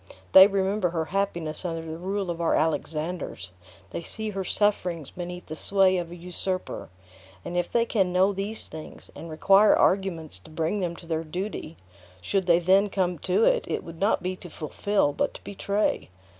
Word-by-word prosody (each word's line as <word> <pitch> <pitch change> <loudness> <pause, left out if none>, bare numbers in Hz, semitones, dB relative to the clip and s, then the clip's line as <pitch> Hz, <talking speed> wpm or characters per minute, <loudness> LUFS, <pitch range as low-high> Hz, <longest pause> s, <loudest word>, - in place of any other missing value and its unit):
They 190 +1 +10
remember 195 -1 0
her 165 -1 -2
happiness 175 -6 -1
under 165 -2 -3
the 160 0 -7
rule 190 0 -2
of 170 0 -5
our 165 - +2
Alexanders; 155 - -2 0.4
they - - -4
see 215 +5 -4
her 195 -1 -3
sufferings 180 -7 +1
beneath 180 0 -7
the 155 - -7
sway 190 +2 +3
of 175 -2 -3
a 175 - -8
usurper; 180 - -4 0.6
and 175 - -5
if 175 0 -1
they 235 -1 +2
can 195 -6 +1
know 190 +2 +3
these 200 +3 -3
things, 155 0 -10
and 165 - -9
require 195 +6 +5
arguments 170 - +1
to - - -16
bring 160 +6 -1
them 175 -3 -2
to 170 - -12
their 165 -1 -2
duty, 175 0 -5 0.4
should 190 - -1
they 170 -1 +6
then 190 +4 +4
come 180 -4 -1
to 190 +7 +1
it, - - +3
it - - -2
would 165 -1 -10
not 200 -2 +2
be 185 +1 -2
to 175 - -11
fulfill, 155 +1 0
but - - -1
to - - -11
betray. 200 - -1
180 Hz, 185 wpm, -26 LUFS, 165-195 Hz, 0.6 s, They